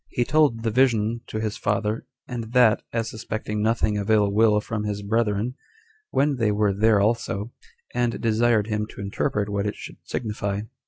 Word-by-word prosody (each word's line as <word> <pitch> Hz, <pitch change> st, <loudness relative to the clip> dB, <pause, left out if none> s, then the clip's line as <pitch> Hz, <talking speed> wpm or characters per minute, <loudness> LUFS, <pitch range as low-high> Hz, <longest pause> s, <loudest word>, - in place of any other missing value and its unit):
He 120 Hz, -, 0 dB
told 140 Hz, -6 st, +2 dB
the 115 Hz, -, 0 dB
vision 115 Hz, -2 st, +2 dB
to 110 Hz, -, -4 dB
his 110 Hz, -1 st, -2 dB
father, 105 Hz, +3 st, -1 dB, 0.2 s
and 115 Hz, -2 st, -6 dB
that, 120 Hz, -4 st, +5 dB
as 115 Hz, -1 st, -1 dB
suspecting 110 Hz, -1 st, -4 dB
nothing 110 Hz, -1 st, +1 dB
of 100 Hz, +1 st, -4 dB
ill 105 Hz, -2 st, +4 dB
will 105 Hz, 0 st, +4 dB
from 105 Hz, 0 st, -4 dB
his 105 Hz, -1 st, -3 dB
brethren, 110 Hz, +2 st, 0 dB, 0.6 s
when 140 Hz, 0 st, +1 dB
they 110 Hz, -3 st, +2 dB
were 105 Hz, -1 st, +2 dB
there 105 Hz, +1 st, +3 dB
also, 110 Hz, 0 st, 0 dB, 0.4 s
and 120 Hz, -1 st, 0 dB
desired 115 Hz, -1 st, +2 dB
him 105 Hz, -1 st, -2 dB
to -, -, -10 dB
interpret 100 Hz, +1 st, -1 dB
what 100 Hz, 0 st, -1 dB
it 105 Hz, -, -3 dB
should -, -, -10 dB
signify. 105 Hz, -3 st, -3 dB
110 Hz, 175 wpm, -24 LUFS, 105-115 Hz, 0.6 s, that